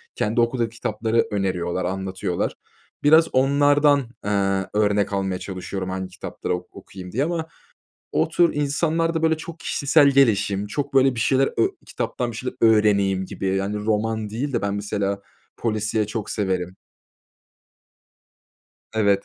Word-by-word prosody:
kendi 110 +3 +1
okuduğu 115 0 0
kitapları 115 0 -1
öneriyorlar, 95 -3 -1
anlatıyorlar. 95 0 -2 0.5
Biraz 160 +3 +6
onlardan, 145 +2 +4 0.3
eee, 100 -2 +1
örnek 105 -1 +1
almaya 95 -2 -1
çalışıyorum, 95 0 -5
hangi 95 0 -3
kitapları 95 0 -5
ok 90 0 -10
okuyayım 95 -2 -10
diye. 130 +8 0
Ama 165 0 -2 0.7
o - - +2
tür 175 -1 +3
insanlar 160 +3 0
da 160 - -1
böyle 160 0 +3
çok 165 +1 -9
kişisel 145 +1 +3
gelişim, 105 -7 +2
çok 140 +7 -4
böyle 135 -1 +5
bir 115 - -3
şeyler 135 +3 +3
ö 115 - +3 0.2
kitaptan 120 -1 -3
bir - - -8
şeyler 125 +2 -4
öğreneyim 100 -4 +3
gibi. 95 +1 -2
Yani, 100 +2 -1
roman 110 0 -1
değil 130 +6 -3
de 120 - -1
ben, 100 0 -1
mesela, 100 -1 -2 0.4
polisiye 110 -1 -1
çok 105 0 -4
severim. 95 -3 -2 2.2
Evet. 100 -2 +2
105 Hz, 140 wpm, -23 LUFS, 95-135 Hz, 2.2 s, Biraz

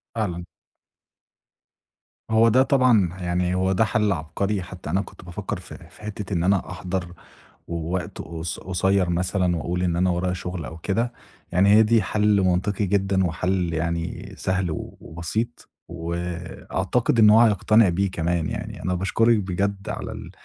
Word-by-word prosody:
فعلًا. 90 -6 -2 1.9
هو 110 +1 +5
ده 130 +4 +5
طبعًا 125 -9 +4
ه 90 0 -8
يعني 90 +1 0
هو 95 +1 +1
ده 105 +4 +3
حَل 105 -1 +1
عبقري، 95 +5 -2
حتى 90 -3 -9
أنا 95 +5 +1
كنت 95 -2 -12
بافكّر 95 +2 -5
في 90 - -11
في - - -17
حِتّة 105 -2 -5
إن 85 -2 +1
أنا 95 +1 +2
أحضر 90 +1 -4 0.6
و 85 - -4 0.2
وقت 90 - -4
قص 85 0 -5
قصيّر 95 0 +1
مثلًا 90 0 +1
وأقول 85 +3 -2
إن 85 -2 +1
أنا 90 +1 +2
ورايا 90 +1 0
شُغل 90 -2 -5
أو 80 - -7
كده، 115 +8 -1 0.4
يعني 90 +3 +4
هي 110 - +8
دي 110 0 +3
حل 105 +1 +2
منطقي 95 +2 +1
جدًا 95 0 +1
وحل 90 +1 -1
يعني 85 +1 -3
سهل 95 -1 -1
و 80 - -6
وبسيط، 110 +9 -4 0.2
وأعتقد 90 +6 -2
إن 105 -2 +8
هو 110 +2 +7
هيقتنع 110 -1 +5
بيه 95 +2 0
كمان 85 -1 -1
يعني. 110 +1 -6
أنا 90 - 0
باشكرِك 115 +5 +2
بجد 100 +1 -2
على - - -4
ال - - -8
95 Hz, 160 wpm, -24 LUFS, 90-105 Hz, 1.9 s, هي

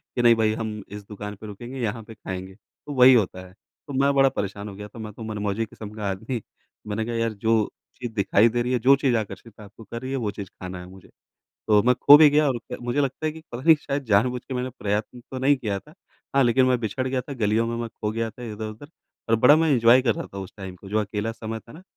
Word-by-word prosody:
कि 120 - +1
नहीं 120 -1 +6
भई 110 -1 +2
हम 110 -1 -4
इस 105 +1 -9
दुकान 105 0 -7
पर 110 +2 -10
रुकेंगे, 120 +6 -8
यहाँ 115 -1 -2
पे 115 - -11
ख़ाएँगे, 95 -2 -7
तो 145 +7 -12
वही 130 -1 +8
होता 95 -5 +1
है। 90 - -18
तो 140 - -15
मैं 140 +1 +3
बड़ा 135 -1 +5
परेशान 100 -3 -4
हो 100 - -9
गया 105 +1 -8
था 115 +3 -13
मैं 110 -1 -6
तो 115 - -9
मन-मौजी 105 0 -2
किस्म 105 -1 -10
का 105 -2 -3
आदमी 110 +5 -4 0.5
मैंने 105 +1 -2
कहा 120 0 -3
यार 115 -1 0
जो 110 +1 +1 0.3
चीज़ 120 -2 -6
दिखाई 105 +2 +4
दे 120 +1 -1
रही 125 +1 -1
है, 125 - +2
जो 135 +4 +6
चीज़ 135 -2 +1
आकर्षित 110 +1 -7
आपको 105 +2 -13
कर 115 +3 -7
रही 130 0 -5
है, 135 - -1
वो 110 -4 -2
चीज़ 100 -2 -8
खाना 90 0 -6
है 90 - -9
मुझे। 95 -1 -15 0.6
तो 105 -1 +5
मैं 125 +3 +4
ख़ो 145 +3 +8
भी 155 -1 +8
गया 150 +1 +4
और 130 -3 -1
क - - -2
मुझे 120 +4 0
लगता 140 +3 -1
है 155 - 0
कि 160 - -11
पता 120 - -5
नहीं 160 +2 +7
शायद 140 -1 -3
जानबूझ 125 +3 +2
के 130 - -4
मैंने 125 +1 -2
प्रयत्न 105 +4 -2
तो 130 - -4
नहीं 140 +2 +3
किया 105 -6 -2
था। 150 +9 -17 0.4
हाँ, 140 - +5
लेक़िन 130 +2 +4
मैं 125 -1 +3
बिछड़ 120 +4 -2
गया 130 0 0
था, 140 - -8
गलियों 110 -2 +1
में 115 0 -2
मैं 115 0 -3
ख़ो 105 -1 -4
गया 115 0 -2
था 115 +3 -13
इधर-उधर 110 +6 -7 0.4
और 115 - +4
बड़ा 125 +7 +7
मैं 160 -1 +2
एन्जॉय 120 0 +6
कर 115 -4 +2
रहा - - -5
था 100 - -5
उस 95 -2 -7
टाइम 95 -2 -7
को 95 +2 -13
जो 105 - 0
अकेला 105 +2 -3
समय 115 0 -6
था 115 - -16
ना। 165 - -13
115 Hz, 270 wpm, -24 LUFS, 105-130 Hz, 0.6 s, वही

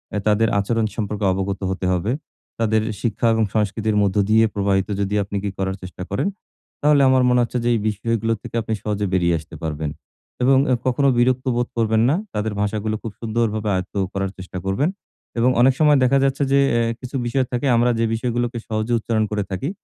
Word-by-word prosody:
আ - - +1
তাদের 110 +1 +3
আচরণ 115 +2 0
সম্পর্কে 105 -2 -2
অবগত 95 +1 -2
হতে 95 0 -3
হবে। 95 +6 -1 0.5
তাদের 110 -1 +2 0.2
শিক্ষা 115 0 0
এবং 110 - +2
সংস্কৃতির 105 0 0
মধ্য 100 -2 0
দিয়ে 110 +1 +5
প্রবাহিত 100 -1 +1
যদি 100 +1 -1
আপনি 100 +1 -4
কি 100 - -1
করার 95 0 -1
চেষ্টা 90 0 -7
করেন, 100 - 0 0.5
তাহলে 150 -1 +4
আমার 130 -1 +4
মনে 125 0 +4
হচ্ছে 120 +1 -3
যে, 120 - +3
এই - - 0
বিষয়গুলো 115 +2 -1
থেকে - - -8
আপনি 110 0 -3
সহজে 105 -1 -1
বেরিয়ে 85 -2 +2
আসতে 80 +1 -12
পারবেন। 75 -1 -2 0.5
এবং 130 +1 +5
এ - - +5
কখনো 135 +2 +2
বিরক্ত 125 +1 +2
বোধ 120 0 0
করবেন 110 -1 +2
না। 150 - +3 0.2
তাদের 105 0 -2
ভাষাগুলো 110 +1 -1
খুব 115 - -4
সুন্দরভাবে 110 -2 -1
আয়ত্ত 95 +2 -4 0.2
করার 95 -1 -2
চেষ্টা 95 0 -8
করবেন। 100 - +1 0.5
এবং 125 +2 +4
অনেক 130 +1 +6
সময় 150 -2 +5
দেখা 130 +2 +4
যাচ্ছে 135 +1 +1
যে 140 - +5 0.2
এ - - +2 0.2
কিছু 130 +1 -8
বিষয় 130 +2 +1
থাকে 125 +2 -1
আমরা 120 +1 +3
যে 115 - +2
বিষয়গুলোকে 120 +1 -1
সহজে 110 +2 -1
উচ্চারণ 110 0 0
করে 105 -1 0
থাকি 115 - -2
110 Hz, 195 wpm, -21 LUFS, 100-120 Hz, 0.5 s, অনেক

